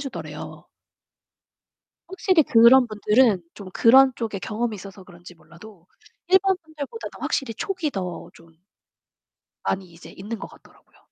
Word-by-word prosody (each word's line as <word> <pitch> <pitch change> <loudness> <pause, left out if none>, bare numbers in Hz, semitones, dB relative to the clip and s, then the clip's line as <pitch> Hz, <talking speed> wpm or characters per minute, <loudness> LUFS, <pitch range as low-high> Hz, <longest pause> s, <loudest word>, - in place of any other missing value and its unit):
주더래요. 275 -2 -8 1.4
확실히 375 -3 +2
그런 245 +1 +6
분들은 215 -2 +2
좀 200 -2 -10
그런 260 +5 +6
쪽에 220 -4 -4
경험이 220 +3 -3
있어서 195 0 -12
그런지 175 -1 -15
몰라도 170 +3 -17 0.4
일반 380 0 +3
분들보다 315 +8 -7
더 - - -13
확실히 255 -5 -2
촉이 360 - -3
더 180 -3 -6
좀 165 0 -19 1.1
많이 190 -3 -3
이제 170 - -14
있는 215 +4 -7
거 - - -7
같더라고요. - - -22
225 Hz, 295 characters per minute, -23 LUFS, 190-270 Hz, 1.4 s, 그런